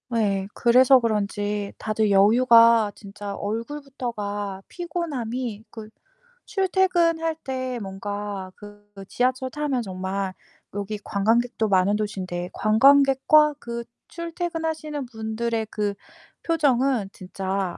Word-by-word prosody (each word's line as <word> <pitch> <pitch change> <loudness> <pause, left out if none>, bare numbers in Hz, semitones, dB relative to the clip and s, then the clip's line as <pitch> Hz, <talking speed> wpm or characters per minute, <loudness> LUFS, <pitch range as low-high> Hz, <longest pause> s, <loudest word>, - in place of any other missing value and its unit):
예. 200 -4 +1
그래서 255 +2 +5
그런지 205 -2 -2
다들 215 -1 0
여유가 230 +1 +6
진짜 200 0 -8
얼굴부터가 220 -4 -4
피곤함이 255 - -4
그 220 -2 -10 0.6
출퇴근할 355 -5 +1
때 255 -1 -3
뭔가 200 0 -5
그 205 0 -14 0.2
지하철 255 +1 0
타면 285 -2 -2
정말 190 -1 -4 0.4
여기 205 +1 -4
관광객도 225 +3 +1
많은 195 +1 +3
도시인데 185 -4 -4
관광객과 275 +6 +5
그 235 -1 -5 0.2
출퇴근하시는 325 -4 -4
분들의 220 0 -3
그 205 -1 -1 0.5
표정은 270 - +1
진짜 190 -1 -4
225 Hz, 240 characters per minute, -24 LUFS, 205-270 Hz, 0.6 s, 여유가